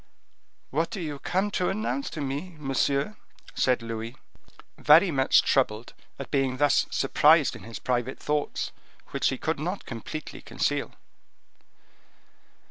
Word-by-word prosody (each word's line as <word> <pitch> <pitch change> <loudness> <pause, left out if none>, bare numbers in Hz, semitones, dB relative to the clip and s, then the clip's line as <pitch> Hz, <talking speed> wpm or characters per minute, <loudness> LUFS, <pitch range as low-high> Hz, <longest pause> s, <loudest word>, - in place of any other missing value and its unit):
"What 160 +5 0
do 220 - -5
you 150 -5 -4
come 190 +7 0
to 180 -2 0
announce 220 +7 -2
to 155 - -6
me, 145 +6 -4
monsieur?" 140 +5 0 0.4
said 125 -2 +1
Louis, 115 +1 -5 0.6
very 165 +5 +6
much 135 -2 +4
troubled 115 -3 +1 0.2
at 135 -2 -8
being 135 -2 +1
thus 145 0 +3
surprised - - +4
in - - -10
his 115 0 -7
private 125 +1 -1
thoughts, 150 0 -2 0.4
which - - +1
he 135 - -2
could 160 +1 -2
not 180 +6 -3
completely 130 +6 -7
conceal. - - -2
140 Hz, 130 wpm, -27 LUFS, 130-165 Hz, 0.6 s, very